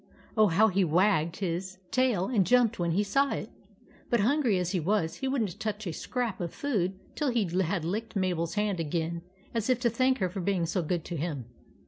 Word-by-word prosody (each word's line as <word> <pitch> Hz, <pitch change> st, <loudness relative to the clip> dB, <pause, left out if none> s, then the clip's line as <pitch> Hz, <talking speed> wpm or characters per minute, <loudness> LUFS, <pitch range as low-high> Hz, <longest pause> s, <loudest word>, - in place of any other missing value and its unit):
Oh, 215 Hz, -1 st, +5 dB
how 200 Hz, +5 st, +4 dB
he 195 Hz, 0 st, +2 dB
wagged 170 Hz, -1 st, +2 dB
his 190 Hz, 0 st, -3 dB
tail 250 Hz, -8 st, +2 dB
and 210 Hz, -3 st, +2 dB
jumped 235 Hz, 0 st, +3 dB
when 170 Hz, -1 st, +1 dB
he 200 Hz, +4 st, +2 dB
saw 275 Hz, +7 st, +2 dB
it! -, -, -5 dB, 0.6 s
But, 235 Hz, -4 st, +3 dB
hun 280 Hz, +9 st, +3 dB
gry 235 Hz, -8 st, +2 dB
as 180 Hz, -1 st, -1 dB
he 190 Hz, -, +1 dB
was, 170 Hz, -1 st, 0 dB
he 265 Hz, -, -2 dB
would 265 Hz, -3 st, +1 dB
n't 190 Hz, -5 st, -5 dB
touch 215 Hz, 0 st, -3 dB
a 170 Hz, -, -3 dB
scrap 235 Hz, 0 st, -3 dB
of 170 Hz, -2 st, -3 dB
food 195 Hz, -10 st, -1 dB, 0.2 s
till 295 Hz, -3 st, 0 dB
he 235 Hz, -3 st, +2 dB, 0.2 s
had 175 Hz, -2 st, -1 dB
licked 215 Hz, +7 st, -3 dB
Mabel's 180 Hz, -3 st, 0 dB
hand 205 Hz, -3 st, 0 dB
again 165 Hz, +1 st, -2 dB, 0.3 s
as 230 Hz, 0 st, -1 dB
if 255 Hz, -1 st, +3 dB
to 235 Hz, -2 st, +2 dB
thank 255 Hz, +3 st, +2 dB
her 185 Hz, -, +1 dB
for 195 Hz, -, -5 dB
being 180 Hz, -2 st, +1 dB
so 175 Hz, +3 st, 0 dB
good 170 Hz, 0 st, -2 dB
to 170 Hz, -, -4 dB
him. 145 Hz, -5 st, -3 dB
195 Hz, 220 wpm, -29 LUFS, 170-230 Hz, 0.6 s, Oh